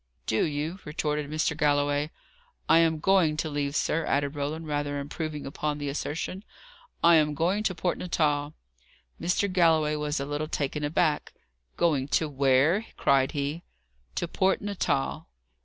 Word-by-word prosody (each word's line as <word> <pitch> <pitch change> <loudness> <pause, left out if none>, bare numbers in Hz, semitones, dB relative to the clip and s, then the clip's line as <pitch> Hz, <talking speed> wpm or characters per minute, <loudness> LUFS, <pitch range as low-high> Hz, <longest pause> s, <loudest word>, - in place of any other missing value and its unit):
"Do 110 - +1
you?" 155 +4 -3
retorted 150 -1 -2
Mr. 155 +1 0
Galloway. 145 0 +1 0.6
"I 160 - +6
am 165 -1 +3
going 170 -3 +3
to 155 0 -2
leave, 145 0 -2
sir," 165 +1 +1
added 140 0 0
Roland, 150 +3 -3
rather 145 -1 -2
improving 150 +1 -5
upon 150 +1 -3
the 145 -1 -3
assertion. 160 +6 -4 0.6
"I 170 -1 +7
am 150 -1 +2
going 180 +7 +1
to 195 -4 -1
Port 175 +1 -1
Natal." 150 -4 0 0.7
Mr. 180 +3 +1
Galloway 160 -4 +3
was 150 0 -2
a 140 - -2
little 145 +2 -3
taken 150 0 -2
aback. 150 0 0 0.4
"Going 150 -6 +2
to 160 - -1
where?" 140 +8 +2
cried 135 +1 +3
he. 145 +3 -2 0.5
"To 175 - -1
Port 190 +3 +1
Natal." 70 - -2
150 Hz, 150 wpm, -27 LUFS, 145-165 Hz, 0.7 s, I